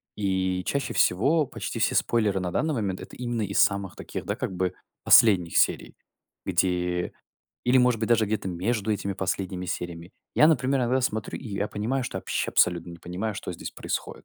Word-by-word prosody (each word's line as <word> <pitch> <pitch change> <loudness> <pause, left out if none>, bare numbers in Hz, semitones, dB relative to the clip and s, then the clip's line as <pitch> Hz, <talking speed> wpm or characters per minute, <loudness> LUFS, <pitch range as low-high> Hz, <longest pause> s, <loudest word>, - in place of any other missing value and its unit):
И 95 -2 0
чаще 140 -1 -2
всего 140 - +3
почти - - -6
все - - +2
спойлеры 105 -5 +1
на 90 -1 -3
данный 155 - 0
момент- 100 -6 -2
это - - -10
именно 120 -2 -3
из 100 0 -1
самых 100 -2 +2
таких, - - -7
да, - - -2
как - - -3
бы 90 0 -1 0.3
последних 90 -7 +6
серий, - - +2 0.5
где 90 -1 0 0.5
или, 125 +1 +4
может 125 -2 +3
быть, 110 - -2
даже 115 -2 +3
где-то 105 -2 -2
между 105 +4 -1
этими 100 -1 -2
последними 95 -1 -3
сериями. 85 +1 -5 0.2
Я, 150 - +7
например, 135 -3 +2
иногда 125 +2 +1
смотрю, 110 -4 -2
и 125 - -9
я 100 +1 -2
понимаю, 125 +6 -2
что 95 -6 -4
вообще - - -2
абсолютно 85 0 +2
не 85 - -10
понимаю, 95 +5 -4
что 90 - -5
здесь - - -7
происходит. - - -5
100 Hz, 185 wpm, -26 LUFS, 90-120 Hz, 0.5 s, Я